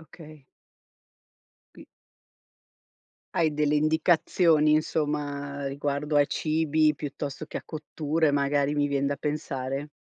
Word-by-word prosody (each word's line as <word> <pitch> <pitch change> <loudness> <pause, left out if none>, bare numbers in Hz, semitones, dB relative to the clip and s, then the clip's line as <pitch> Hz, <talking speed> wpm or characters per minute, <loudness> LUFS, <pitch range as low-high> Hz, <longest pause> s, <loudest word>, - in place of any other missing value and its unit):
Okay. 155 -2 -14 1.3
Qui - - -14 1.5
Hai 160 -2 +2
delle 150 0 +1
indicazioni 155 0 +3
insomma 145 -2 -1
riguardo 145 +2 -2
ai 145 -1 +5
cibi, 155 -1 +1
piuttosto 145 0 -5
che - - -6
a - - -12
cotture, 155 0 -1
magari 140 0 +1
mi 145 0 +1
vien 140 -1 0
da 140 - -1
pensare. 140 -1 -3
150 Hz, 110 wpm, -27 LUFS, 140-155 Hz, 1.5 s, ai